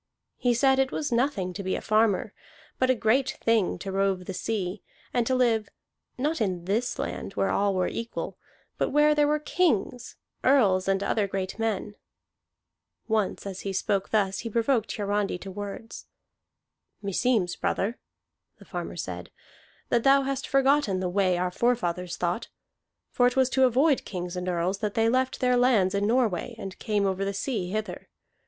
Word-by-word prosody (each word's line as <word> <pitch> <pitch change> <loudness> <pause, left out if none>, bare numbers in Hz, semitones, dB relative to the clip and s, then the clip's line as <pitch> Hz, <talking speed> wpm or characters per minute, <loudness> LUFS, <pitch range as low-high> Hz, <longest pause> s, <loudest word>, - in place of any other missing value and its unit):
He 245 -1 +2
said 265 +2 +3
it 270 0 +2
was 295 - -2
nothing 235 -7 0
to 200 - -5
be 190 -1 -1
a - - -2
farmer, 215 -2 +2 0.5
but 255 - +2
a 260 - +4
great 245 +4 +1
thing 225 -5 +2
to 195 +2 -6
rove 195 -1 0
the 190 - -5
sea, 195 -1 -3 0.3
and 240 -2 +1
to 260 - +2
live, 230 -4 +2 0.5
not 295 +2 -1
in 180 -5 -1
this 225 +6 -1
land - - -4
where 195 - 0
all 200 -1 +1
were 185 -1 +1
equal, 230 0 -5 0.4
but - - +1
where 295 +1 +4
there 295 -1 +3
were 300 +1 +2
kings, 295 - 0 0.3
earls, 200 -9 +4
and 195 0 +1
other 205 0 +1
great 190 +1 -4
men. 220 -2 -1 1.1
Once 215 -4 0
as 195 -1 -5
he 195 - -4
spoke 195 0 -1
thus 195 -3 +1
he 230 - -4
provoked 230 0 +1
Hiarandi 205 -2 -1
to 195 +2 -8
words. 205 +3 -7 1.0
"Meseems, 200 -1 +1
brother," 220 +5 -1 0.6
the - - -16
farmer - - -5
said, - - -6 0.6
"that 235 -1 +2
thou 275 0 +5
hast 275 0 -3
forgotten 275 -7 +3
the 185 -1 -1
way 185 -1 +2
our 180 0 -1
forefathers 180 -6 0
thought. 175 +5 -1 0.6
For 245 - +4
it 250 - -1
was 260 -1 +3
to 265 0 +4
avoid 265 +4 +3
kings 180 -2 -5
and 180 0 -3
earls 180 +2 -1
that 210 -2 -2
they 225 0 +3
left 260 +2 0
their 250 -1 +3
lands 225 -7 +3
in 200 +1 +1
Norway 235 -2 +1
and 195 -4 -7
came 205 -2 0
over 190 0 0
the 200 0 -2
sea 200 -4 -2
hither. 215 +2 -4
215 Hz, 175 wpm, -27 LUFS, 190-250 Hz, 1.1 s, thou